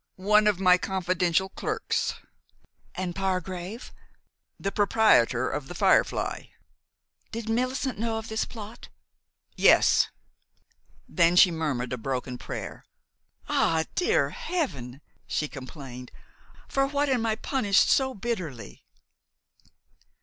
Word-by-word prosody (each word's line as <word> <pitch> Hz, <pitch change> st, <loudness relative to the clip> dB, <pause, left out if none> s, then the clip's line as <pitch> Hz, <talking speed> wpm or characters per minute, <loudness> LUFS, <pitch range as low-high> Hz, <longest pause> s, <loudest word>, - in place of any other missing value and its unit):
"One 210 Hz, +3 st, +3 dB
of 205 Hz, -3 st, +2 dB
my 180 Hz, -1 st, +5 dB
confidential 185 Hz, -1 st, 0 dB
clerks." -, -, -2 dB, 0.8 s
"And 180 Hz, -2 st, -3 dB
Pargrave?" 190 Hz, +2 st, -4 dB, 0.7 s
"The 195 Hz, -, -2 dB
proprietor 195 Hz, -, +3 dB
of 145 Hz, -2 st, -4 dB
'The 175 Hz, -, -8 dB
Firefly.'" -, -, +1 dB, 0.9 s
"Did 230 Hz, -1 st, -5 dB
Millicent 255 Hz, +1 st, -1 dB
know 225 Hz, 0 st, -1 dB
of 225 Hz, 0 st, -6 dB
this 220 Hz, 0 st, -1 dB
plot?" 220 Hz, 0 st, -10 dB, 0.7 s
"Yes." -, -, +5 dB, 1.0 s
Then 170 Hz, -1 st, +3 dB
she 180 Hz, 0 st, +7 dB
murmured 145 Hz, -7 st, -2 dB
a 125 Hz, -, -4 dB
broken 125 Hz, 0 st, -4 dB
prayer. -, -, -7 dB, 0.6 s
"Ah, 160 Hz, -1 st, +2 dB
dear 360 Hz, -, +1 dB
Heaven!" 170 Hz, -, -4 dB, 0.3 s
she 150 Hz, -, -1 dB
complained, 130 Hz, -2 st, -9 dB, 0.6 s
"for 275 Hz, 0 st, +1 dB
what 285 Hz, +1 st, 0 dB
am 245 Hz, -4 st, +1 dB
I 220 Hz, -, +1 dB
punished 210 Hz, -5 st, +2 dB
so 265 Hz, -1 st, +2 dB
bitterly?" 180 Hz, -, -5 dB
190 Hz, 110 wpm, -27 LUFS, 155-225 Hz, 1.0 s, she